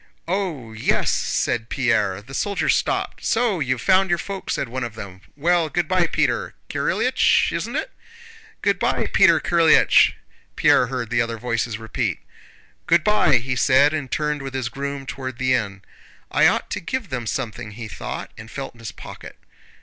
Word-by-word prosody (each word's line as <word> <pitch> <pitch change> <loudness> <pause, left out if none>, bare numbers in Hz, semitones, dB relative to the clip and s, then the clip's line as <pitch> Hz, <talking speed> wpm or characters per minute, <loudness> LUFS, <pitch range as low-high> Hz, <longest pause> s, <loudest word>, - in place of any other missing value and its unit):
"Oh, 165 - -3
yes!" 110 - +1
said 115 -1 -1
Pierre. 105 -7 0
The 135 +5 -13
soldiers 200 +7 +1
stopped. - - -2
"So 225 -6 +1
you've 130 -4 -1
found 190 0 +4
your 175 - +2
folk?" 195 +2 -6
said - - -1
one 130 +2 -4
of 115 -3 -6
them. 95 -3 -9 0.2
"Well, 170 +1 +2
good 175 +2 -1
by, 180 -1 +2
Peter 485 - -1
Kirílych—isn't - - +1
it?" - - -2 0.7
"Good - - +2
by, - - 0
Peter - - +6
Kirílych!" 165 -2 +5 0.4
Pierre 125 - +4
heard 120 -2 -4
the 120 +1 +2
other 115 0 -2
voices 115 -1 -2
repeat. 110 -1 -2 0.7
"Good 170 -1 +4
by!" 210 0 +4
he 130 +2 0
said 135 +4 +4
and 145 -4 -3
turned 150 0 -1
with 135 -1 -6
his 130 -2 -2
groom 140 +2 -5
toward 130 -3 -6
the 130 0 +1
inn. 100 -5 -2 0.5
"I - - +5
ought - - 0
to - - -2
give 215 +3 -4
them 125 -3 -4
something!" 110 -3 -4
he 115 +1 -7
thought, - - -6
and 115 0 -10
felt 135 +2 -6
in 120 - -21
his 115 -1 -6
pocket. - - -11
130 Hz, 170 wpm, -22 LUFS, 115-165 Hz, 0.7 s, Peter